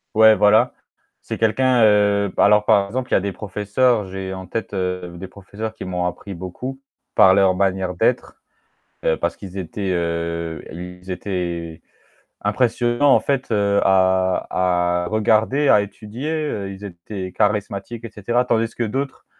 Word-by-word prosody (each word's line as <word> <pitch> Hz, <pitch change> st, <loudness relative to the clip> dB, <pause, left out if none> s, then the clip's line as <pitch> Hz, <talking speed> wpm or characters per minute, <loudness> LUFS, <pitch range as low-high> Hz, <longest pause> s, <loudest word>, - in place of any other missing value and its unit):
Ouais 110 Hz, 0 st, +7 dB
voilà, 105 Hz, +1 st, +4 dB, 0.5 s
c'est -, -, -5 dB
quelqu'un, 120 Hz, +2 st, +3 dB
heu, 100 Hz, -2 st, +3 dB
alors 105 Hz, +1 st, +5 dB
par 100 Hz, -1 st, +4 dB
exemple 125 Hz, +4 st, -4 dB
il -, -, +4 dB
y -, -, +6 dB
a -, -, +2 dB
des 100 Hz, 0 st, -3 dB
professeurs, 105 Hz, +2 st, 0 dB
j'ai 95 Hz, 0 st, -6 dB
en 95 Hz, -1 st, -8 dB
tête, 110 Hz, +1 st, -5 dB
heu, 90 Hz, -2 st, -3 dB
des 95 Hz, +2 st, -7 dB
professeurs 100 Hz, +3 st, -7 dB
qui -, -, -9 dB
m'ont 90 Hz, -1 st, -2 dB
appris 95 Hz, +3 st, -5 dB
beaucoup, 95 Hz, +10 st, -7 dB, 0.4 s
par 95 Hz, -3 st, +7 dB
leur 95 Hz, -1 st, +4 dB
manière 95 Hz, -1 st, 0 dB
d'être, -, -, -1 dB, 0.6 s
heu, -, -, +2 dB
parce -, -, -2 dB
qu'ils 95 Hz, -1 st, -10 dB
étaient, 95 Hz, +2 st, -3 dB
heu, 85 Hz, -1 st, -2 dB
ils 90 Hz, +2 st, -8 dB
étaient 85 Hz, -3 st, -4 dB, 0.6 s
impressionnants 120 Hz, +5 st, +2 dB
en -, -, +3 dB
fait 135 Hz, -3 st, -1 dB
heu 100 Hz, -1 st, +2 dB
à 95 Hz, -2 st, +2 dB
à -, -, -4 dB
regarder, 110 Hz, +7 st, +2 dB
à 105 Hz, -, +6 dB
étudier, 110 Hz, +7 st, -7 dB
heu, 145 Hz, -11 st, -3 dB
ils 95 Hz, +2 st, -12 dB
étaient 95 Hz, 0 st, -7 dB
charismatiques 105 Hz, +3 st, -2 dB
et 115 Hz, -, -6 dB
cetera. 120 Hz, +4 st, 0 dB
Tandis 115 Hz, -2 st, 0 dB
que 120 Hz, -, -1 dB
d'autres, 135 Hz, +5 st, -4 dB
100 Hz, 160 wpm, -21 LUFS, 90-110 Hz, 0.6 s, Ouais